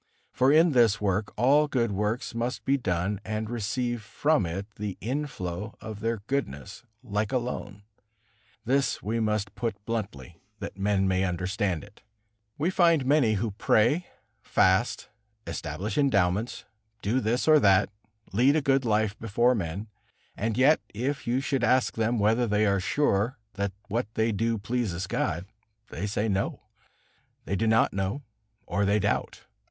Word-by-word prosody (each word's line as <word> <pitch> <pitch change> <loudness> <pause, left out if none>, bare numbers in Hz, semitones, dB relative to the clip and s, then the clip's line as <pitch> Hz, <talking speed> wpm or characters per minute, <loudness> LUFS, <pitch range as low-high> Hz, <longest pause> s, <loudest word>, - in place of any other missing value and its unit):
For 130 +2 +3
in 160 +3 +5
this 115 -6 +4
work 100 0 0
all 140 +6 +4
good 120 -6 0
works 105 +5 -2
must 120 +2 -3
be 135 - +3
done 95 -4 -1
and 110 +1 -3
receive 120 +1 -2
from 110 - +1
it 95 +4 -4
the 105 -2 -4
inflow 110 -6 -4
of 110 -1 -7
their 115 -1 -2
goodness, 110 - -3 0.2
like 105 -2 -2
a 130 - +2
loan. 105 -5 -5 0.8
This 135 +3 +1
we 115 +2 -1
must 105 -2 -1
put 115 -3 -2
bluntly, 100 - -5 0.2
that - - -7
men 100 0 +1
may 95 0 +1
understand 95 0 -1
it. 105 +1 -16 0.6
We 160 +5 0
find 170 -7 +3
many 135 -5 +3
who 110 +1 -1
pray, 120 - +2 0.3
fast, 95 +6 +2 0.4
establish 90 - -3
endowments, 105 -5 +1 0.4
do 115 +6 +1
this 120 +4 0
or 155 -1 +7
that, 100 -5 +4 0.4
lead 130 +8 +4
a 155 - +3
good 135 0 +3
life 110 -2 +1
before 120 +3 +2
men, 100 0 -3 0.5
and 110 +1 -2
yet 140 +5 +5 0.2
if 135 +5 -2
you 125 +3 +1
should 135 -2 -1
ask 130 +1 +3
them 115 +2 0
whether 110 +3 +2
they 105 0 +2
are 100 -1 +2
sure 115 +2 +1 0.2
that 100 0 -2 0.2
what 115 +3 -1
they 110 +1 +2
do 115 +2 0
pleases 100 -4 -2
God, 85 -1 -2 0.4
they 100 +5 -4
say, 105 +2 -1
"No"; 100 -1 -1 0.8
they 95 - -1
do 115 +3 0
not 110 0 +3
know, 100 +9 -2 0.4
or 100 +3 -1
they 100 +1 +3
doubt. 100 0 -1
110 Hz, 155 wpm, -27 LUFS, 100-125 Hz, 0.8 s, or